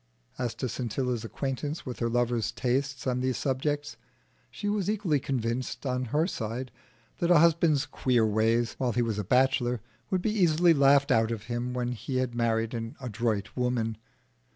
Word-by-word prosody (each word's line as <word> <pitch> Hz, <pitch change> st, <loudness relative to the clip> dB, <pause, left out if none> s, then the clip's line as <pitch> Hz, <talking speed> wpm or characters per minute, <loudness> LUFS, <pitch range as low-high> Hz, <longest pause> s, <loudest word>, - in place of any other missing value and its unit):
As 120 Hz, -3 st, -2 dB
to 130 Hz, -, -2 dB
Scintilla's 120 Hz, 0 st, -2 dB
acquaintance 140 Hz, +6 st, -4 dB
with 125 Hz, -3 st, -6 dB
her 115 Hz, -, 0 dB
lover's 120 Hz, -1 st, 0 dB
tastes 135 Hz, +1 st, -1 dB
on 125 Hz, -1 st, 0 dB
these 130 Hz, -1 st, 0 dB
subjects, 145 Hz, +2 st, -2 dB, 0.5 s
she 205 Hz, -, -5 dB
was 205 Hz, -2 st, 0 dB
equally 195 Hz, -9 st, +1 dB
convinced 125 Hz, 0 st, -3 dB
on 125 Hz, -1 st, -1 dB
her 150 Hz, +7 st, +1 dB
side 125 Hz, -, -4 dB, 0.5 s
that 170 Hz, -, +1 dB
a 175 Hz, -, +7 dB
husband's 165 Hz, -3 st, +4 dB
queer 120 Hz, -4 st, +1 dB
ways 110 Hz, +2 st, +2 dB
while 125 Hz, -3 st, 0 dB
he 120 Hz, -, +2 dB
was 110 Hz, -3 st, -1 dB
a -, -, -1 dB
bachelor 125 Hz, +1 st, +2 dB, 0.3 s
would 185 Hz, -1 st, 0 dB
be 220 Hz, -, +1 dB
easily 175 Hz, -4 st, +4 dB
laughed 140 Hz, -1 st, +4 dB
out 110 Hz, 0 st, +3 dB
of 115 Hz, -3 st, -4 dB
him 120 Hz, +2 st, -3 dB
when 125 Hz, -1 st, -1 dB
he 130 Hz, +2 st, -3 dB
had 130 Hz, -2 st, -1 dB
married 115 Hz, -1 st, 0 dB
an 115 Hz, 0 st, -4 dB
adroit 110 Hz, -4 st, -2 dB
woman. 125 Hz, -3 st, 0 dB
125 Hz, 175 wpm, -28 LUFS, 115-140 Hz, 0.5 s, a